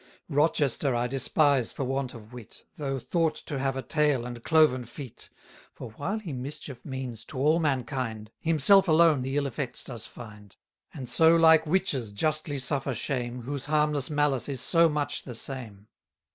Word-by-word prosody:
Rochester 145 -3 +2
I 120 +1 0
despise 135 0 +2
for - - -4
want 135 -1 -2
of 110 +1 -13
wit, 120 -3 -12
Though 135 -2 -3
thought 165 +4 0
to 140 -3 -4
have 135 0 -1
a 135 - -4
tail 150 -6 +1
and 120 -1 -8
cloven 155 -6 +4
feet; 120 +2 -10 0.5
For - - -9
while 175 - -3
he 190 -9 -6
mischief 130 0 -7
means 130 -5 -6
to 145 - -8
all 150 +5 +3
mankind, 125 -7 -2
230 165 - -3
Himself 190 +5 +5
alone 160 -3 +5
the 135 +2 -2
ill 145 - +1
effects 135 -1 -4
does 120 -5 -7
find: 105 -4 -12 0.4
And 130 -3 -8
so 160 +6 +5
like 160 -1 +5
witches 150 - 0
justly 155 +6 -1
suffer 135 -1 0
shame, 125 -1 -3
Whose 140 +2 -5
harmless 150 -2 +1
malice 145 -3 +1
is 135 -2 -2
so 165 +6 +4
much 145 -1 -2
the 125 - -8
same. 115 -6 -6
135 Hz, 170 wpm, -27 LUFS, 125-150 Hz, 0.5 s, Himself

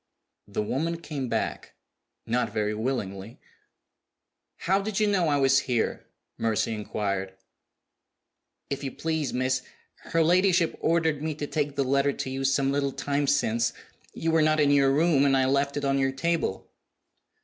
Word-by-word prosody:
The 105 +1 -2
woman 165 +9 -2
came 145 -6 -5
back - - -3 0.5
not 115 -1 0
very 105 0 -1
willingly. 105 -3 -4 1.2
"How 190 +3 +2
did 210 0 -2
you 215 - +3
know 195 -5 +2
I 145 -1 +2
was 135 0 +4
here?" 120 -3 -1 0.3
Mercy 115 0 0
inquired. 100 -3 -3 1.4
"If 140 0 -3
you 135 - -3
please, 160 -2 -2
miss, 130 +1 0 0.5
her 165 0 +3
ladyship 180 0 +3
ordered 160 -3 +1
me 155 -1 -2
to 150 - -4
take 145 -1 -2
the 140 - +1
letter 140 +1 +2
to 130 - -5
you 135 0 -3
some 135 0 +2
little 140 -1 0
time 140 +1 -1
since. 115 -4 +1 0.4
You 165 - -1
were 160 0 +4
not 155 0 +3
in 145 -1 +4
your 140 -1 +4
room, 150 -1 +3
and 135 -1 +4
I 130 - +3
left 140 +2 +1
it 145 - -2
on 135 0 +1
your 135 0 +1
table." 145 - -2
140 Hz, 160 wpm, -26 LUFS, 130-155 Hz, 1.4 s, was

